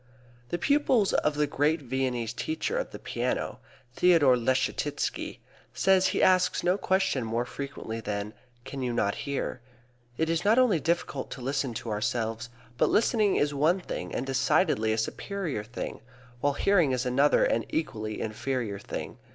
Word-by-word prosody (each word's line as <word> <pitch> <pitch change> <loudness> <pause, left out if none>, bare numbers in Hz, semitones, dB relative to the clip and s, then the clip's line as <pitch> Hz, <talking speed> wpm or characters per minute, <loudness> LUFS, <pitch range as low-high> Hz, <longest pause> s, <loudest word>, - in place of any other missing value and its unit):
The 175 - -1
pupils 260 - +2
of 150 0 +2
the 150 0 +2
great 150 +2 +1
Viennese 125 -3 -2
teacher 155 +6 -2
of - - -1
the - - -8
piano, - - -2 0.3
Theodor 160 -5 +5
Leschetizky, 125 +2 -1 0.3
say 190 0 +4
he 190 - +1
asks 185 -1 +3
no 180 +1 +3
question 190 -8 +1
more 115 +2 -1
frequently 125 -4 -6
than 105 -1 -4 0.3
"Can 140 - -6
you 125 -2 -1
not 100 -3 +1 0.2
hear?" 135 -2 -3 0.6
It 160 - +1
is 165 +1 0
not 215 +3 +4
only 245 -10 +4
difficult 165 -4 -1
to 135 - -7
listen 135 -1 -1
to 115 0 -4
ourselves, 115 +1 -2 0.3
but - - +4
listening 215 -2 +3
is 145 0 +1
one 155 +7 +2
thing 90 - -5
and 130 - -2
decidedly 135 - +2
a 110 - 0
superior 160 - -3
thing, 120 +3 -6 0.4
while 145 +3 +1
hearing 170 -4 +3
is 125 0 -1
another 140 +4 +3
and 115 - +1
equally 110 -9 -3
inferior 115 -2 -3
thing. - - -6
135 Hz, 160 wpm, -28 LUFS, 115-175 Hz, 0.6 s, Theodor